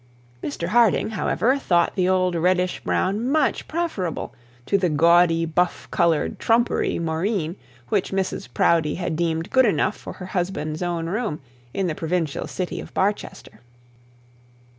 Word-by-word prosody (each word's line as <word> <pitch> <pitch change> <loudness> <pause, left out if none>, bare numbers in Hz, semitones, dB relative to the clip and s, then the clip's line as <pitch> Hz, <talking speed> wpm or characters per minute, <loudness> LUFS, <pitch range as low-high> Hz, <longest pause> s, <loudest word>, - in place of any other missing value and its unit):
Mr 170 +4 -3
Harding, 230 -1 +3
however, 255 +4 +1
thought 175 -9 +2
the 185 -1 +1
old 185 -1 +2
reddish 180 +2 +1
brown 200 +4 0
much 300 -3 +1
preferable 305 - -3 0.3
to - - 0
the 185 -3 +2
gaudy 165 +2 +4
buff 175 +2 0
coloured 170 -4 +1
trumpery 235 +1 +1
moreen 165 +1 -1 0.3
which - - 0
Mrs 190 -9 -2
Proudie 155 +2 +2
had 175 -3 -3
deemed 165 0 -1
good 260 -2 +5
enough 210 - +1
for - - -9
her 185 - -9
husband's 175 -4 -2
own 175 -2 -2
room 205 -3 -2 0.3
in 195 - -1
the 170 - -1
provincial 165 -1 -2
city 180 -1 -4
of - - -11
Barchester. 195 - -2
180 Hz, 140 wpm, -23 LUFS, 165-200 Hz, 0.3 s, good